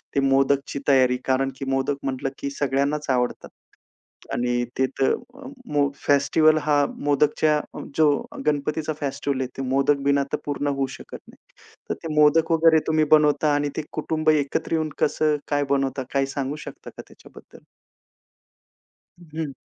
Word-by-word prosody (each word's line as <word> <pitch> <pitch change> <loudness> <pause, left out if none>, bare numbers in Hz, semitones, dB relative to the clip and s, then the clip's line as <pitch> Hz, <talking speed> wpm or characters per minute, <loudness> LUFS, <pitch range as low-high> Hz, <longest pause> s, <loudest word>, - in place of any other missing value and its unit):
ते - - +3
मोदकची 135 +1 +1
तयारी. 130 -3 +4
कारण, 135 +1 +1
की 135 - -6
मोदक 135 +1 0
म्हटलं, 135 0 -2
की 140 - -3
सगळ्यांनाच 140 +2 0
आवडतात. 125 -2 -1 0.8
आणि 120 0 0
ते 130 - +3
तर 135 - +3
अ, 255 +3 -9 0.3
मो 145 -1 +3
फेस्टिव्हल 155 +3 +3
हा 145 -1 +2 0.2
मोदकच्या 150 +1 +2 0.4
जो 155 -1 +5 0.4
गणपतीचा 150 +1 -1
फेस्टिव्हल 140 -1 -2
आहे 130 - -1
ते - - -3
मोदक 140 +2 +2
बिना 140 0 +3
तर - - +2
पूर्ण 145 0 -2
होऊ 140 -1 0
शकत - - -10
नाही. - - -17 0.5
तर - - +1
ते 160 -2 -4
मोदक 150 +2 +4
वगैरे 165 -1 +5
तुम्ही 155 0 +3
बनवता 150 -1 +4
आणि 145 0 0
ते 155 - -1
कुटुंब 155 0 -1
एकत्र 155 +1 0
येऊन 160 -1 0
कसं 150 0 +2
काय 145 -1 +1
बनवता? 135 -1 0
काही 135 -1 +1
सांगू 140 0 -3
शकता - - -10
का - - -10
त्याच्याबद्दल? - - -16 1.8
हं. 155 -3 -3
145 Hz, 155 wpm, -23 LUFS, 135-150 Hz, 1.8 s, जो